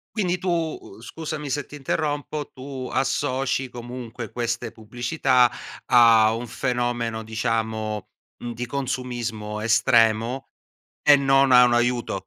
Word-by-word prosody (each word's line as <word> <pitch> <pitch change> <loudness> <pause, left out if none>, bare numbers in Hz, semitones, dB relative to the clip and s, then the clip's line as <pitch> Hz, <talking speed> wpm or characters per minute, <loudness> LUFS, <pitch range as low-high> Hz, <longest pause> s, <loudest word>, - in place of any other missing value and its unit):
Quindi 180 -4 0
tu, 185 0 -2
uhm, 160 - -3
scusami 150 +2 -6
se 145 0 -2
ti - - -12
interrompo, 145 +1 -2
tu 130 -1 -7
associ 135 -1 0
comunque 120 -2 -8
queste 120 -1 -3
pubblicità, 125 +2 +1 0.4
a 115 -2 +6
un 120 +2 -4
fenomeno 120 -2 -2
diciamo, 110 -2 -2 0.3
mhmm, 120 -1 -5
di 120 +2 -4
consumismo 120 -5 -4
estremo, 115 +2 +2 0.6
e 145 -1 +7
non 135 -1 +3
a 125 0 +8
un 120 -1 +3
aiuto? 120 0 +1
120 Hz, 120 wpm, -24 LUFS, 115-135 Hz, 0.6 s, a